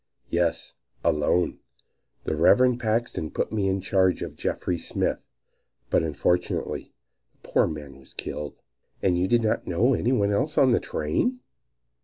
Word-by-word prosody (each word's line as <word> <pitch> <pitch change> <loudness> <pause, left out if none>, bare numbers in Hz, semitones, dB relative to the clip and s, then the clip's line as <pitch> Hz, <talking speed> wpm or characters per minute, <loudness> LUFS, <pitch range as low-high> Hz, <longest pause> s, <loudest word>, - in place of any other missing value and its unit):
"Yes, 85 -1 0 0.3
alone; 75 +4 +1 0.6
the - - -1
Reverend 125 +10 +4
Paxton 110 -8 -1
put - - -2
me 105 -3 0
in 95 0 0
charge 95 -1 +2
of - - -7
Jeffries 90 -2 -2
Smith; - - 0 0.7
but - - +4
unfortunately 80 +3 -1 0.4
the - - -19
poor - - +3
man 75 -3 -7
was 65 - -17
killed." 75 -2 -4 0.5
"And 90 -2 +3
you 90 - +2
did 120 +2 +3
not 110 - 0
know 115 +10 +3
any 120 0 +1
one 105 -6 +2
else 140 +9 0
on 130 -2 +5
the 120 - +4
train?" 245 - -1
95 Hz, 150 wpm, -26 LUFS, 80-120 Hz, 0.7 s, on